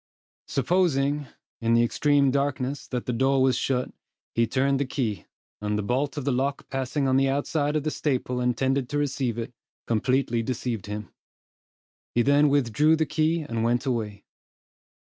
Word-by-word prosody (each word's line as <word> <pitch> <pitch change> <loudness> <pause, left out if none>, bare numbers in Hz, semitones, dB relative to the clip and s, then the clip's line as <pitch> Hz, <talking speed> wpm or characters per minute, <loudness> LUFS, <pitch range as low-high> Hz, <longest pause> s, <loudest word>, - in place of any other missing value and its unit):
Supposing, 145 -2 +1 0.3
in 115 0 +2
the 115 - +5
extreme 140 +3 +3
darkness, 140 0 -1
that 125 -2 -3
the 125 - -1
door 135 +3 +2
was 130 -1 +3
shut, 125 -2 -1 0.4
he 115 0 +2
turned 135 +3 +1
the 140 - +1
key; 110 - -3 0.3
and 105 0 -1
the 105 - -1
bolt 135 +7 -1
of 140 - -3
the 140 - +2
lock 135 +3 -1
passing 135 +1 -1
on 130 0 +3
the 135 0 +3
outside 145 +2 0
of 150 - 0
the 155 - -1
staple 125 -4 -1
intended 130 +1 0
to 145 - -1
receive 135 -5 -1
it, 120 +1 -5 0.3
completely 120 +1 +1
deceived 115 -3 -3
him. 105 0 -6 1.0
He 120 - +4
then 145 +2 +4
withdrew 145 +3 +3
the 160 0 +1
key, 160 +2 +1
and 115 -5 -3
went 120 +2 +1
away. 110 -6 -3
130 Hz, 165 wpm, -26 LUFS, 120-145 Hz, 1.0 s, the